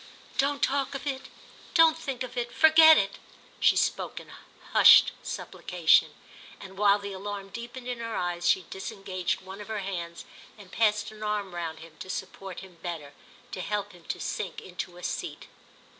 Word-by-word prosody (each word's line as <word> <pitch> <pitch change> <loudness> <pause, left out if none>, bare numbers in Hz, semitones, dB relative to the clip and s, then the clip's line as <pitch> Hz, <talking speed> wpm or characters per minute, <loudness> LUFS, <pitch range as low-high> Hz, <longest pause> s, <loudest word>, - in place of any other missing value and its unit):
"Don't 280 +1 +1
talk 275 0 0
of 275 - -6
it—don't 315 +3 +1
think 270 -5 -4
of 250 0 -8
it; 240 -1 -2
forget 315 +1 +8
it!" 195 0 0 0.4
She - - +5
spoke - - 0
in - - -14 0.4
hushed - - +8
supplication, - - +1 0.4
and 190 0 -11
while 200 0 +4
the 200 -1 -7
alarm 200 0 -6
deepened 240 +3 -8
in 245 -1 -4
her 230 -1 -4
eyes 175 0 -1
she 190 - +3
disengaged 190 -2 -3
one 190 +2 -9
of 205 - -9
her 220 -2 -3
hands 170 -3 -5 0.3
and 200 -3 -14
passed 210 -2 +1
an 215 0 -13
arm 210 -3 -2
round 165 -2 -5
him 160 -1 -14
to 185 - -8
support 190 0 -6
him 185 -3 -14
better, 160 -5 -6 0.4
to 185 - -5
help 205 +1 -2
him 175 -3 -17
to - - -4
sink 195 -4 -4
into 180 -1 -7
a 180 - -12
seat. - - -4
200 Hz, 175 wpm, -28 LUFS, 185-240 Hz, 0.4 s, forget